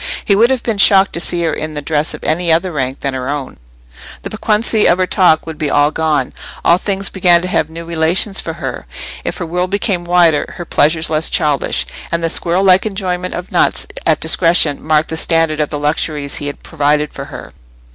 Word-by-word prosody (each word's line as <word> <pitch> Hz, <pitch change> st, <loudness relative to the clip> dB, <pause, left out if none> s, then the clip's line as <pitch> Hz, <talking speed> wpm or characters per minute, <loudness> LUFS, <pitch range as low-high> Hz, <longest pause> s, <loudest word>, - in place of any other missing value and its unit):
He 200 Hz, -, +3 dB
would 230 Hz, +4 st, +4 dB
have 260 Hz, -2 st, -1 dB
been 225 Hz, -4 st, -2 dB
shocked 195 Hz, 0 st, +5 dB
to -, -, -4 dB
see 175 Hz, 0 st, +1 dB
her 160 Hz, -2 st, 0 dB
in 155 Hz, 0 st, -5 dB
the 150 Hz, -, -4 dB
dress 150 Hz, 0 st, -1 dB
of -, -, -13 dB
any 170 Hz, +2 st, 0 dB
other 170 Hz, +3 st, +1 dB
rank 135 Hz, -3 st, -3 dB
than 140 Hz, -1 st, -2 dB
her 130 Hz, 0 st, -4 dB
own; 145 Hz, -2 st, -5 dB, 0.7 s
the -, -, -6 dB
piquancy 215 Hz, 0 st, +1 dB
of 175 Hz, -, +3 dB
her 185 Hz, -, +1 dB
talk 180 Hz, -4 st, +2 dB
would 160 Hz, -2 st, -8 dB
be 150 Hz, -, -1 dB
all 145 Hz, +1 st, +3 dB
gone, 155 Hz, -1 st, -1 dB, 0.3 s
if 175 Hz, +2 st, +4 dB
things 195 Hz, -1 st, -2 dB
began 175 Hz, -2 st, +4 dB
to -, -, -2 dB
have 160 Hz, -4 st, 0 dB
new 165 Hz, +1 st, -8 dB
relations 170 Hz, +5 st, +2 dB
for -, -, -5 dB
her, -, -, -6 dB, 0.4 s
if -, -, -4 dB
her 180 Hz, -, -4 dB
world 180 Hz, +2 st, -2 dB
became 195 Hz, -2 st, -1 dB
wider, 175 Hz, -3 st, +2 dB
her 175 Hz, -, -6 dB
pleasures 160 Hz, +1 st, +1 dB
less 155 Hz, +1 st, +2 dB
childish; 150 Hz, -4 st, 0 dB, 0.3 s
and 170 Hz, 0 st, -1 dB
the 165 Hz, -, 0 dB
squirrel 175 Hz, +3 st, +1 dB
like 190 Hz, +2 st, +4 dB
enjoyment 185 Hz, -3 st, -3 dB
of 180 Hz, +1 st, -7 dB
nuts -, -, +1 dB, 0.2 s
at -, -, +2 dB
discretion 165 Hz, -4 st, +2 dB
marked 155 Hz, 0 st, +1 dB
the 160 Hz, -, -4 dB
standard 165 Hz, -2 st, +1 dB
of 150 Hz, -, 0 dB
the 150 Hz, -, -4 dB
luxuries 145 Hz, -1 st, -2 dB
he 145 Hz, -, -5 dB
had 145 Hz, -, -7 dB
provided 150 Hz, -1 st, 0 dB
for -, -, -7 dB
her. -, -, -10 dB
165 Hz, 215 wpm, -15 LUFS, 150-185 Hz, 0.7 s, shocked